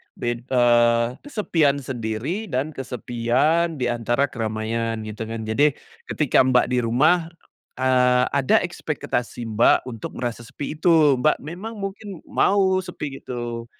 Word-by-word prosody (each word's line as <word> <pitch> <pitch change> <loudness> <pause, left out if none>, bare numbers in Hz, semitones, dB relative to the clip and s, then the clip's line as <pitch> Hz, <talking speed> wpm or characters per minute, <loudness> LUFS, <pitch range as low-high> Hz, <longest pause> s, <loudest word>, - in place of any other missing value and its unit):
bed 120 +1 -4
eee, 120 -2 +4 0.2
kesepian 160 - +1
sendiri, 130 - -4
dan 135 +5 -2
kesepian 135 +6 0
diantara 120 +3 0
keramaian, 115 0 -2
gitu 110 +1 -6
kan. 115 0 -5
Jadi, 140 +6 +2 0.3
ketika 130 -3 +2
Mbak 125 -1 +4
di 125 - +2
rumah, 160 +9 +3 0.5
eee, 125 -1 +3
ada 135 -2 +3
ekspektasi 120 -1 -4
Mbak, 115 +3 +3
untuk 115 -3 -7
merasa 120 -1 -4
sepi 145 +5 -6
itu. 155 -5 +4
Mbak 155 +3 +3
memang 185 +9 -7
mungkin 195 -2 -6
mau 190 -2 +3
sepi 145 -6 -6
gitu 120 -1 -5
125 Hz, 125 wpm, -23 LUFS, 120-155 Hz, 0.5 s, eee